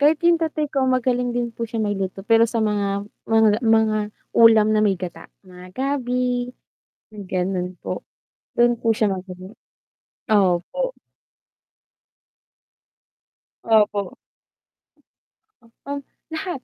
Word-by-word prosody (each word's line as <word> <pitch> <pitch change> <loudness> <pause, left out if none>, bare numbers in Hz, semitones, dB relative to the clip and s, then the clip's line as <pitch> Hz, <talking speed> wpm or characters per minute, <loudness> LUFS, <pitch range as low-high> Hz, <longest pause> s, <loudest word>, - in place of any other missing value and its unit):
kahit 300 +3 +3
yung 340 -1 +4
tatay 305 -2 -2
ko 275 - +1
magaling 250 -1 +1
din 240 -1 -2
po 230 0 -5
siya 230 - -6
may 205 - 0
luto, 195 0 -4
pero 230 0 +4
sa 225 -2 0
mga 200 -1 -1 0.2
mga 220 -1 +4
mga 220 -2 +3 0.3
ulam 220 -2 +6
na 215 - +3
may 200 -3 +2
gata, 180 -1 -8 0.2
mga 180 0 -13
gabi, 250 -2 -1 0.8
ganun, 180 -1 -3
po, - - -5 0.6
dun 240 0 +5
po 230 0 0
siya 215 -1 +1
magaling. 185 +1 -6 0.8
Opo. 205 - +1 2.7
Opo. 210 -4 +2 1.5
Um, 280 +5 -8 0.3
lahat. 320 -1 -4
225 Hz, 110 wpm, -22 LUFS, 200-250 Hz, 2.7 s, ulam